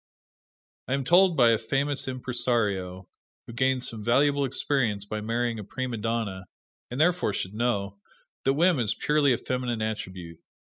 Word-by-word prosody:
I 130 - +1
am 135 - -2
told 175 +4 +4
by 120 -3 +6
a 115 - +2
famous 140 0 -1
impresario, 115 -8 -1 0.4
who 120 - -10
gained 130 +1 +1
some 110 -3 -3
valuable 140 +4 +3
experience 120 -6 -1
by 105 +1 -4
marrying 115 +1 -1
a - - -6
prima 125 +3 -4
donna, 110 -4 -3 0.4
and 125 - -5
therefore 165 - +2
should 95 0 -3
know, 100 -4 -1 0.4
that 135 - +3
whim 170 -1 +3
is 110 -4 0
purely 150 -2 +2
a 120 - +2
feminine 125 -3 -2
attribute. 90 -6 -5
120 Hz, 155 wpm, -26 LUFS, 105-135 Hz, 0.4 s, by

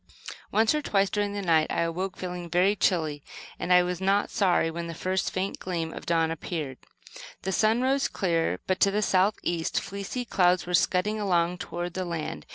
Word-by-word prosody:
Once 220 +4 +3
or 300 - 0
twice 200 -7 +1
during 205 -1 -1
the 205 -1 -3
night 160 -3 +3
I - - 0
awoke 180 +3 -2
feeling 180 -1 -5
very 180 +4 +3
chilly, 160 -7 0 0.4
and 180 - -2
I 180 0 +7
was 180 0 -3
not 195 +2 +2
sorry 180 -4 +2
when 170 +1 -5
the 165 - -6
first 185 +3 -1
faint 190 +1 -3
gleam 165 -3 -3
of - - -9
dawn 165 -1 +2
appeared. 155 -4 -5 0.6
The 190 - -1
sun 220 +5 +2
rose 270 +1 +2
clear, 170 -4 0
but, 185 0 0
to 200 - +5
the 210 +2 0
south 195 +2 +3
east, 170 -2 -1
fleecy 200 +6 -5
clouds 180 -4 +2
were 180 - -5
scudding 200 +4 +2
along 180 -3 +1
toward 175 0 -5
the 185 - -2
land. 160 - -5
180 Hz, 195 wpm, -27 LUFS, 170-200 Hz, 0.6 s, I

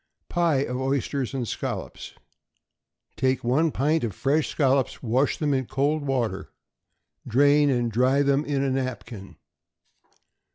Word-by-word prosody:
=Pie 165 -6 +1
of 125 +1 -4
Oysters 135 0 -2
and 125 -3 -2
Scallops.= - - -5 1.0
Take 130 0 0
one 140 +7 +2
pint 150 +3 +1
of 110 -6 -3
fresh 145 +3 +1
scallops, 135 -3 +1
and 115 - -5
wash 130 +4 +2
them 150 -2 0
in 130 -2 -1
cold 145 +2 0
water; 115 -8 -2 0.8
drain, 145 +4 +4
and 120 -3 0
dry 130 +5 +2
them 140 +1 +2
in 140 -2 -1
a 135 - 0
napkin. 120 - -5
135 Hz, 135 wpm, -25 LUFS, 125-145 Hz, 1.0 s, drain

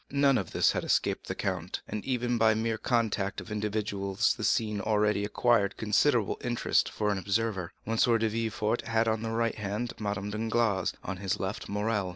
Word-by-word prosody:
None 140 -1 +3
of - - -5
this - - +3
had - - -2
escaped - - 0
the - - -3
count, 90 -2 -3
and 105 0 -4
even 125 -2 0
by 110 -1 +5
this 110 - -1
mere 115 -1 -1
contact 110 -5 0
of 110 - -10
individuals 105 0 0
the 110 - -7
scene 105 -1 +1
had 100 - -4
already 105 -1 +2
acquired 105 -1 +2
considerable 110 +1 +2
interest 120 -1 +1
for 105 -1 -1
an 100 - -1
observer. 100 -2 -1
M. 115 +1 -1
de 115 -1 +3
Villefort 110 0 -1
had 115 0 +1
on 110 -1 +1
the 115 - -3
right 115 0 0
hand 105 +3 -3
Madame 100 -1 -3
Danglars, 110 -3 0
on 100 0 -4
his 95 0 -2
left 95 +3 -4
Morrel. 105 -1 -1
110 Hz, 195 wpm, -29 LUFS, 100-115 Hz, -, by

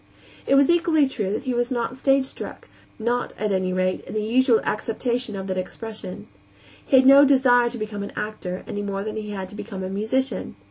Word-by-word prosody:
It 275 - +4
was 280 +3 +5
equally 330 -4 +3
true 205 -7 -3
that 215 - -2
he 255 -2 -2
was 240 +1 0
not 240 0 -2
stagestruck 270 0 -1 0.3
not, 240 +2 -1
at 210 -1 -1
any 185 -1 0
rate, 185 0 0
in - - -10
the 215 - 0
usual 235 +1 +3
acceptation 235 +1 -2
of 190 -1 -5
that 185 -1 -2
expression. 215 0 -7 0.6
He 270 - +4
had 260 - +5
no 275 +1 +9
desire 255 -3 +4
to 240 - -6
become 215 -2 -5
an 200 - -5
actor, 195 -4 -5
any 205 - -4
more 200 -1 -3
than 215 0 -5
he 215 -1 -5
had 195 -2 -5
to 205 - -10
become 200 -3 -6
a 185 - -3
musician. 220 +6 -2
220 Hz, 205 wpm, -23 LUFS, 200-260 Hz, 0.6 s, no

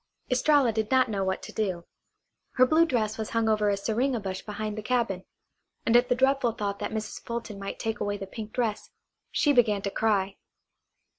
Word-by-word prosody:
Estralla 265 -1 +4
did 220 0 -1
not 260 -2 +4
know 195 -2 -1
what 190 0 -2
to - - -8
do. 185 -5 -2 0.7
Her 255 - +5
blue 315 +5 +4
dress 225 -6 -1
was 220 - -3
hung 230 -1 +1
over 215 -1 +2
a 200 - +1
syringa 235 +5 0
bush 190 -2 -4
behind 210 0 -4
the 215 - -4
cabin. 215 -5 -1 0.6
And 230 - +3
at 245 +1 +5
the 245 - +3
dreadful 265 -2 +2
thought 200 -2 -3
that - - -3
Mrs. 215 -1 -5
Fulton 230 -3 -5
might 195 0 -5
take 225 -1 -3
away 205 0 -1
the 195 - -6
pink 215 +2 -8
dress 225 -4 -2 0.4
she 290 -2 +2
began 215 -6 +3
to 200 - -2
cry. 200 -3 0
220 Hz, 200 wpm, -27 LUFS, 205-245 Hz, 0.7 s, Her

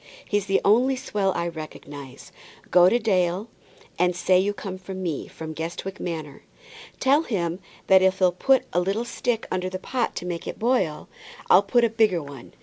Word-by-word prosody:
He's 205 -1 0
the 195 - +3
only 245 +6 +4
swell 210 -7 -1
I 170 0 -1
recognize. 145 -4 -9 0.4
Go 180 0 +7
to 235 - +2
old 240 - 0
Dale, 185 0 +1 0.5
and 180 0 +2
say 180 +1 +3
you 200 +2 +1
come 195 -2 -7
from 190 0 -7
me, 165 -5 -3
from 160 -1 -8
Guestwick 170 +4 -5
Manor. 160 -4 -5 0.6
Tell 275 +3 +4
him 180 - -2 0.3
that 190 -1 +6
if 190 0 +3
he'll 185 -2 +4
put 265 +9 +3
a 175 - +3
little 195 +6 -1
stick 240 -1 -2
under 185 0 -1
the 185 - -4
pot 240 +5 -2
to - - -5
make 175 -2 -4
it - - -5
boil, 220 -10 0 0.4
I'll 185 - +8
put 235 +4 +2
a - - +5
bigger 215 -8 +2
one. 140 -3 -12
185 Hz, 190 wpm, -24 LUFS, 170-215 Hz, 0.6 s, I'll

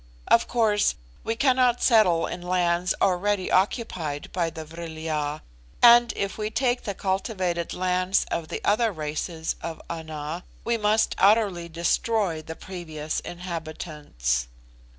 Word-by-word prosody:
Of 230 - +4
course, 215 - +2 0.3
we 225 - -1
cannot 255 -1 +3
settle 185 -9 +5
in - - -5
lands 180 0 +1
already 190 +1 +1
occupied 185 - 0
by 170 -2 0
the 160 -1 -8
Vril 165 0 -8
ya; 155 -2 -2 0.4
and 240 0 +7
if 200 +1 -3
we 215 0 -1
take 245 +2 0
the 200 - -3
cultivated 190 -3 -1
lands 185 +1 +1
of 165 -1 -2
the - - -5
other 220 +2 +3
races 160 0 -3
of 165 -1 -5
Ana, 160 +1 -5 0.2
we 235 - +1
must 215 0 +2
utterly 195 -4 +3
destroy 170 +1 0
the 160 +1 -8
previous 160 -5 -5
inhabitants. 155 - -4
180 Hz, 130 wpm, -25 LUFS, 160-210 Hz, 0.4 s, and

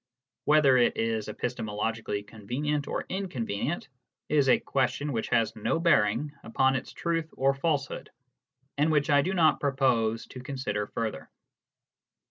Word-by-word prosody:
Whether 150 -4 +5
it 120 - +3
is 115 -1 -1
epistemologically 110 -2 -3
convenient 135 +8 -3
or - - -3
inconvenient 150 - -3 0.4
is 145 -3 +3
a - - +5
question 140 +2 -1
which 115 - -2
has 115 -1 +2
no 110 +9 0
bearing 140 - +2
upon 130 +3 +2
its 130 - -4
truth 165 -2 -2
or 135 +1 +3
falsehood, 140 0 -2 0.7
and 155 +2 +3
which 150 -1 +2
I 145 0 +6
do 190 +6 -1
not 160 -3 +4
propose 125 -5 +1
to 130 - -9
consider 125 -6 -3
further. 115 -2 -4
130 Hz, 135 wpm, -28 LUFS, 115-150 Hz, 0.7 s, I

